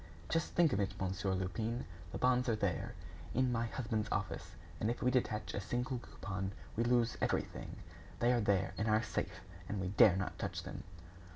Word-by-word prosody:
"Just 165 -1 0
think 170 -3 +5
of 100 - +2
it, 100 0 -1
Monsieur 95 0 0
Lupin, 110 +6 -1 0.3
the - - -3
bonds 125 0 +3
are 115 - +3
there, 100 -5 -1 0.4
in 130 +1 +3
my 115 0 +1
husband's 110 -3 -1
office, - - -2 0.2
and 110 - +1
if 120 - -2
we 125 - +4
detach 110 -4 0
a 100 - -1
single 125 +4 -1
coupon, 95 -4 -4 0.2
we 115 - +2
lose 120 -1 +3
everything! - - -1 0.4
They 120 +1 +4
are 120 - +3
there, 100 -2 +2
in 110 - +1
our 110 +1 +4
safe, 110 - -3 0.3
and 100 - -1
we 95 -1 -1
dare 100 -1 +7
not 95 -1 -2
touch - - -3
them." - - -7
110 Hz, 190 wpm, -36 LUFS, 95-120 Hz, 0.4 s, dare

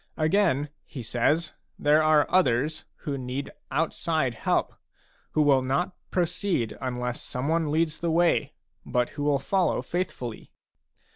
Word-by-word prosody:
Again, 155 -3 +2
he 130 -5 -8
says, 145 +8 +1 0.2
there 150 +1 +4
are 155 -1 +5
others 150 -3 +2 0.2
who 140 -2 -2
need 130 +2 -4 0.2
outside 160 -4 0
help, - - 0 0.6
who 155 - +4
will 140 -3 +5
not 140 +9 -1
proceed 175 - 0
unless 125 -1 -3
someone 155 +5 -1
leads 155 +1 +1
the 170 - -1
way, 170 +1 +2 0.3
but 125 -1 0
who 145 - -7
will 145 -1 +3
follow 185 +5 +1
faithfully. 150 -10 -4
150 Hz, 130 wpm, -27 LUFS, 130-165 Hz, 0.6 s, are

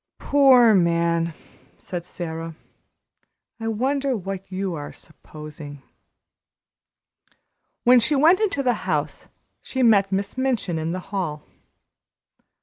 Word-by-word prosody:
"Poor 260 -5 +5
man!" 170 -2 +1 0.4
said 175 -3 -6
Sara; 165 -2 -6 1.0
"I 225 - -4
wonder 265 +3 -1
what 195 0 -7
you 190 -1 -3
are 145 -3 -6
`supposing'?" 150 -3 -11 2.0
When 250 +1 +6
she 265 +6 +1
went 320 +6 +5
into 385 -10 0
the 250 -2 +2 0.2
house - - -2 0.3
she 260 -1 -2
met 200 -4 +4
Miss 200 +5 -2
Minchin 240 -11 -1
in 160 +1 -3
the 185 - -3
hall. 155 -7 -3
195 Hz, 110 wpm, -23 LUFS, 165-250 Hz, 2.0 s, When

